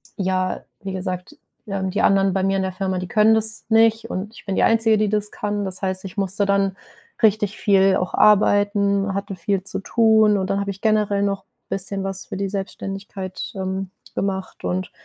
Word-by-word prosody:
ja, 185 -1 -1 0.2
wie 195 -1 -4
gesagt, 185 0 -5 0.3
ja, 195 -2 -3
und 190 +1 -3
die - - +2
anderen 195 -1 +4
bei 190 0 0
mir 195 0 +1
in - - 0
der 190 - -2
Firma, 185 0 -2
die 180 - -5
können 215 +3 +4
das 220 -1 -1
nicht 225 0 +3
und 200 +4 -4
ich - - -14
bin 195 - -2
die - - +2
Einzige, 225 -1 +4
die 215 -1 +2
das 210 0 -1
kann. 205 -1 -3
Das 190 0 -4
heißt, 190 0 -2
ich 195 +2 -9
musste 195 +1 +1
dann 195 -1 +1 0.5
richtig 210 -1 +3
viel 195 -2 +4
auch 180 - -3
arbeiten, 205 -1 +3
hatte 200 -1 -4
viel 190 +2 -1
zu - - -3
tun 220 -1 +4
und 190 0 -2
dann 195 0 +1
habe 200 - -2
ich 195 - -11
generell 210 -2 +2
noch 195 -1 -2 0.2
bisschen 195 0 -2
was 195 0 -4
für - - -6
die 195 0 -2
Selbstständigkeit, 195 0 -5
ähm, 190 0 -3 0.3
gemacht 190 -1 -3
und 185 +1 -2
195 Hz, 205 wpm, -22 LUFS, 190-210 Hz, 0.5 s, anderen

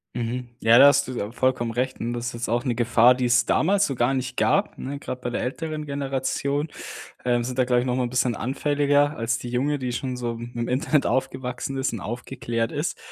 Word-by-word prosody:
Mhm. 120 +1 -3
Ja, 115 +2 +6
da 140 - +10
hast 140 -1 +4
du - - -5
ja 105 +2 -3
vollkommen 125 -2 0
recht, 130 +2 -2
n 120 +1 -2
das 120 0 -3
ist - - -4
jetzt 115 -1 -4
auch 120 +1 +1
'ne 125 -3 -1
Gefahr, 120 +1 +5
die 125 0 -1
es 120 0 +4
damals 195 +5 +3
so 140 - -2
gar 120 +2 +1
nicht 130 -1 -3
gab, 200 - +2
ne, 140 +2 -5
grad 125 -2 -6
bei 120 - -2
der - - -2
älteren 155 +3 -4
Generation, 140 +1 -2 0.6
ähm, 120 -1 +2
sind 130 +1 -4
da 125 - +4
glaube 125 -1 +2
ich - - -3
nochmal 125 0 0
ein - - -8
bisschen 125 -2 +1
anfälliger 145 +3 +1
als 115 0 0
die 120 - -7
junge, 140 +4 0
die 125 -1 -3
schon 125 +1 -3
so 120 -1 -3
mit 120 +1 -9
dem 120 0 -2
Internet 145 +2 +1
aufgewachsen 130 +1 -2
ist 130 -2 -1
und 110 - -4
aufgeklärt 120 0 -3
ist. 150 +3 -2
125 Hz, 235 wpm, -24 LUFS, 120-140 Hz, 0.6 s, da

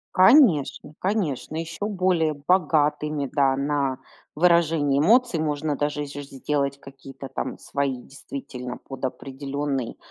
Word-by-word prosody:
Конечно, 185 - +5
конечно. 180 - -2
Ещё 165 +4 -4
более 180 -6 +1
богатыми, 150 -3 +1
да, 135 -2 +3
на 140 -1 -1 0.4
выражение 160 -4 +3
эмоций 225 - +4
можно 150 -1 -1
даже 145 +1 -1
и - - -6
же 145 0 -7
сделать 140 0 -2
какие-то 135 0 -11
там - - -4
свои, 140 -2 -2
действительно, 125 -2 -8
под 135 -1 -7
определённый, 135 -1 -4
145 Hz, 120 wpm, -24 LUFS, 140-165 Hz, 0.4 s, Конечно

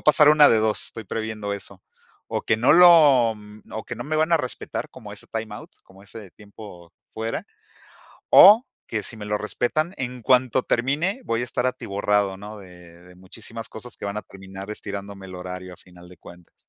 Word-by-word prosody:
pasar 150 0 +6
una 150 -1 +7
de 115 - +4
2, 110 0 +1
estoy 115 - -8
previendo 110 0 -4
eso. 100 -1 -8 0.4
O - - -3
que 110 - 0
no 120 +5 +4
lo 155 -9 +6 0.4
o 110 - -5
que - - -5
no 120 - -6
me 155 +3 -2
van 160 +2 +1
a 165 - +5
respetar, 125 -4 -5
como - - -12
ese - - -9
time 110 -1 -5
out, - - -11
como 95 +1 -19
ese 100 -1 -11
tiempo 100 -5 -14 0.2
fuera. 110 +1 -4 0.8
O 215 +7 +8 0.2
que 110 - -2
si 120 - -3
me 105 - -8
lo 105 0 -1
respetan, 155 - -2
en 125 -1 -5
cuanto 125 +1 +2
termine 155 - 0
voy 115 +1 -1
a - - -1
estar 125 +1 -2
atiborrado, 100 -4 -1
¿no? 105 +2 -10
De 90 -2 -16
de 90 0 -17
muchísimas 110 +5 -8
cosas 120 +1 -10
que - - -7
van 100 +1 -4
a 105 - -3
terminar 95 +1 -11
estirándome 100 -2 -7
el 95 - -9
horario 90 0 -8
a - - -15
final 90 -1 -17
de 90 - -16
cuentas. 90 -1 -16
110 Hz, 200 wpm, -23 LUFS, 95-125 Hz, 0.8 s, O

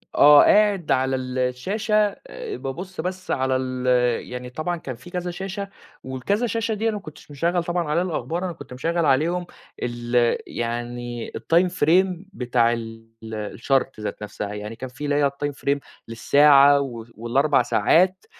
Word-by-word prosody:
آه 145 0 +8
قاعد 205 -5 +3
على 130 0 +2
الشاشة، 130 - -2 0.3
آآ 485 -4 -6
بابُصّ 180 +8 -6
بس 185 0 -5
على 130 -1 +1
ال 130 -1 -3 0.4
يعني 125 0 -6
طبعًا 165 +7 -3
كان 130 -6 -7
فيه 175 +9 -14
كذا 180 0 -3
شاشة، 195 +2 -5 0.3
والكذا 200 - -1
شاشة 225 0 -1
دي 220 +2 -1
أنا 215 - -2
ما 205 - -5
كنتش 155 -3 -13
مشغّل 170 +4 0
طبعًا 175 0 -1
عليها 170 +4 +2
الأخبار 175 +1 -3
أنا 175 - -3
كنت 155 - -11
مشغّل 165 +6 -1
عليهم، 165 +7 +2 0.4
ال 120 0 +1
يعني 120 0 -4
الtime 175 +2 +2
frame 180 +2 +2
بتاع 120 -3 +1
ال 115 -1 -7 0.5
الchart 135 -1 0
ذات 105 0 -5
نفْسها، 105 0 -5
يعني 105 +2 -6
كان 130 +3 -7
في 135 +4 -10
اللي 145 0 0
هي 145 -1 +3
الtime 145 +1 -4
frame 140 +1 -1 0.3
للساعة 140 +4 +5
وف 120 -4 -7
وال4 135 +5 +2
ساعات، 180 - +2
145 Hz, 160 wpm, -23 LUFS, 125-180 Hz, 0.5 s, آه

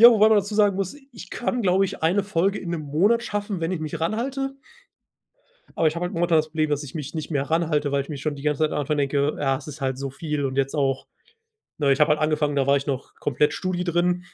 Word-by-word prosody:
Ja, 235 +1 +11
wobei 215 -1 +6
man 220 - +5
dazu 205 +1 -2
sagen 205 -2 +4
muss: 195 +6 -3 0.2
Ich 190 -5 -10
kann, 245 0 -2
glaube 190 +1 +3
ich, 185 - -5
1 190 +5 +3
Folge 195 0 +1
in 175 - -5
1 165 -2 -2
Monat 190 +12 +2
schaffen, 205 -3 -3
wenn 165 +3 -1
ich 170 - -2
mich 155 +1 -4
ranhalte 270 +10 -2 1.2
aber 160 - +2
ich 155 - -4
habe 175 - -2
halt 180 - -3
momentan 170 -1 +3
das 155 0 0
Problem, 155 -1 -1
dass 145 0 0
ich 145 - -9
mich 150 -1 -5
nicht 155 +1 -4
mehr 140 -2 0
ranhalte, 155 -3 +1
weil 140 -1 +2
ich 140 - -14
mir 150 - -4
schon 150 +1 -2
die 140 - -9
ganze 150 0 0
Zeit 155 - +3
von - - -2
Anfang 150 +1 0
an 145 - -3
denke: 140 +1 +1
„Ja, 135 -2 +1
das 145 +2 -10
ist 150 0 -8
halt 130 -1 -1
so 135 -1 -4
viel.“ 150 0 -3
Und 130 0 -2
jetzt 135 +2 0
auch 135 -2 0 0.7
ne, 140 -3 +2
ich 135 - +2
habe 150 - +5
halt 150 - +3
angefangen, 150 -1 +1
da 135 -1 +1
war 140 0 +5
ich 140 - -6
noch 135 -1 -4
komplett 145 +1 +1
Studi 185 -1 -2
drin. 175 +1 +1
155 Hz, 270 wpm, -24 LUFS, 145-185 Hz, 1.2 s, Ja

